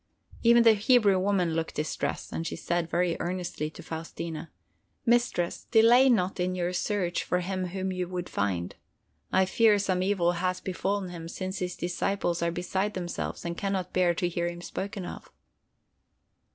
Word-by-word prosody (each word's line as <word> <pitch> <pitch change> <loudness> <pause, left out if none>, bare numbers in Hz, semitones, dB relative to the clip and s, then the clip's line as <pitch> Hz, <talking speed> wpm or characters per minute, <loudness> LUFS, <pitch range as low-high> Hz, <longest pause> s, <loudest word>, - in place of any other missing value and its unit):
Even 235 0 +6
the 225 -1 +8
Hebrew 215 -3 +4
woman 185 -3 +1
looked 165 0 -2
distressed, 155 +1 -3
and 165 - -2
she - - -4
said 170 -1 -1
very 175 0 +1
earnestly 175 -3 -3
to - - -12
Faustina: 165 0 -6 0.6
"Mistress, 235 -8 +1
delay 240 +3 +6
not 195 -6 +2
in 180 +1 0
your 180 0 -1
search 180 -1 -1
for 180 - 0
him 185 0 -2
whom 190 +1 -3
you 180 -1 -2
would 180 -1 -4
find! 90 -4 -1 0.6
I 190 0 +4
fear 215 +2 +4
some 190 -2 0
evil 185 -3 +2
has 180 +1 -1
befallen 190 +1 -2
him, 165 -2 -7
since 185 +2 -4
his 180 -1 -3
disciples 175 0 -1
are 170 - +2
beside 190 +4 -2
themselves 175 -1 -4
and 170 0 -2
can 195 +2 -2
not 185 -2 -3
bear 180 -2 +3
to 175 - 0
hear 170 0 -1
him 175 0 -8
spoken 195 0 -5
of." - - -9
180 Hz, 170 wpm, -28 LUFS, 175-195 Hz, 0.6 s, the